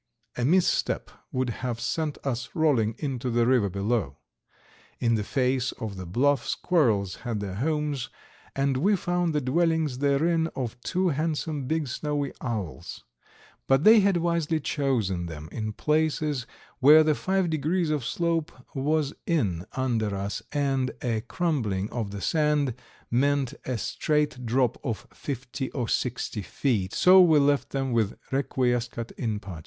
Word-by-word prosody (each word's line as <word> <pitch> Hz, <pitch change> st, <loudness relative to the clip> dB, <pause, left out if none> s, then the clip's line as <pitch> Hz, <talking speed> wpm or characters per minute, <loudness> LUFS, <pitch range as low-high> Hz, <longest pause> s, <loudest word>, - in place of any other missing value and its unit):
A 125 Hz, -, -2 dB
misstep 175 Hz, +7 st, +2 dB, 0.2 s
would 130 Hz, -1 st, -1 dB
have 120 Hz, -3 st, -2 dB
sent 155 Hz, +4 st, -2 dB
us 125 Hz, -3 st, -2 dB
rolling 130 Hz, -10 st, +2 dB
into 130 Hz, -4 st, -3 dB
the 120 Hz, 0 st, +2 dB
river 120 Hz, -5 st, +3 dB
below. 100 Hz, -, -1 dB, 0.8 s
In 115 Hz, -1 st, +2 dB
the 110 Hz, -2 st, +1 dB
face 130 Hz, +2 st, 0 dB
of 110 Hz, -4 st, -6 dB
the 95 Hz, -2 st, -7 dB
bluff 135 Hz, +9 st, +1 dB
squirrels 110 Hz, -, +1 dB
had 115 Hz, -3 st, -3 dB
their 100 Hz, -2 st, -4 dB
homes, 145 Hz, +1 st, -1 dB, 0.5 s
and 135 Hz, -1 st, +1 dB
we 200 Hz, +9 st, +3 dB
found 175 Hz, -2 st, 0 dB
the 150 Hz, -, +2 dB
dwellings 160 Hz, 0 st, +1 dB
therein 160 Hz, +4 st, +2 dB
of 120 Hz, -2 st, -4 dB
two 185 Hz, +5 st, 0 dB
handsome 155 Hz, -2 st, -2 dB
big 160 Hz, 0 st, 0 dB
snowy 145 Hz, +2 st, -2 dB
owls, 100 Hz, -, -5 dB, 0.6 s
but 135 Hz, +2 st, +4 dB
they 220 Hz, +2 st, +8 dB
had 200 Hz, -2 st, +3 dB
wisely 170 Hz, -2 st, 0 dB
chosen 115 Hz, -, -1 dB
them 80 Hz, -2 st, -8 dB
in 110 Hz, -2 st, -3 dB
places 150 Hz, -1 st, 0 dB, 0.3 s
where 150 Hz, +4 st, +8 dB
the 155 Hz, 0 st, +3 dB
five 190 Hz, +2 st, 0 dB
degrees 160 Hz, +2 st, 0 dB
of 150 Hz, -4 st, 0 dB
slope 165 Hz, +4 st, -1 dB, 0.2 s
was 145 Hz, +1 st, 0 dB
in 100 Hz, -, 0 dB
under 115 Hz, -6 st, 0 dB
us 100 Hz, +1 st, -3 dB
and 135 Hz, -3 st, 0 dB
a 115 Hz, -3 st, 0 dB
crumbling 120 Hz, -, -1 dB
of 115 Hz, -4 st, -3 dB
the 100 Hz, 0 st, -6 dB
sand 150 Hz, -3 st, +1 dB, 0.4 s
meant 140 Hz, +1 st, +2 dB
a 130 Hz, -2 st, -2 dB
straight 150 Hz, 0 st, -1 dB
drop 125 Hz, 0 st, +1 dB
of 120 Hz, -3 st, -3 dB
fifty 130 Hz, 0 st, -5 dB
or 125 Hz, -4 st, -2 dB
sixty 120 Hz, -3 st, -2 dB
feet, 100 Hz, -3 st, -1 dB
so 185 Hz, +1 st, +7 dB
we 165 Hz, -4 st, +6 dB
left 145 Hz, 0 st, +2 dB
them 135 Hz, -1 st, -2 dB
with 110 Hz, -4 st, 0 dB
"requiescat 125 Hz, -3 st, -1 dB
in 110 Hz, -3 st, -3 dB
pace." 95 Hz, -5 st, -8 dB
135 Hz, 150 wpm, -26 LUFS, 115-155 Hz, 0.8 s, they